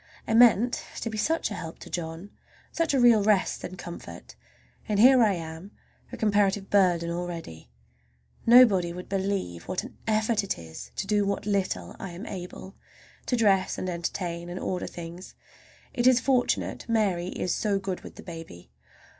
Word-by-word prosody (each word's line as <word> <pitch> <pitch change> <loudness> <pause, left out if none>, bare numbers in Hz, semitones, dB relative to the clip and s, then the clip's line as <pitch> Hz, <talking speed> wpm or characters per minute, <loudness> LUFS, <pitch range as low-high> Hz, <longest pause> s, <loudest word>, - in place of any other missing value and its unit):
I 225 - 0
meant 235 0 +5 0.2
to 230 - -3
be 215 - -5
such 320 -2 0
a - - -2
help 165 -4 -7
to - - -10
John, 165 +3 -5 0.4
such 330 -4 0
a - - +3
real 240 -3 +6
rest 205 -2 +1
and 185 - -6
comfort, 175 -1 -9 0.5
and 205 -1 +1
here 255 +2 +7
I 215 -3 +4
am 165 +2 -7 0.4
a - - -7
comparative 205 -2 +1
burden 175 -4 +3
already! 170 - -6 0.8
Nobody 210 -8 +6
would 180 +1 -8
believe 190 - -2
what 185 - -2
an - - -11
effort 220 0 +1
it 200 - -2
is 80 -7 -10
to - - -3
do 210 -1 +2
what 200 +1 -2
little 190 - -1
I 190 -3 -6
am 185 +6 -8
able—to 190 +6 -8
dress 200 -5 +2
and 185 - -3
entertain, 170 0 -4
and 180 +1 -5
order 180 -1 -3
things. 170 +1 -9 0.6
It 240 0 +2
is 255 -1 +6
fortunate 250 -1 0
Mary 195 -6 +1
is 180 -1 -2
so 205 -3 0
good 195 -2 -4
with - - -11
the - - -11
baby. 165 - -10
195 Hz, 170 wpm, -27 LUFS, 170-215 Hz, 0.8 s, here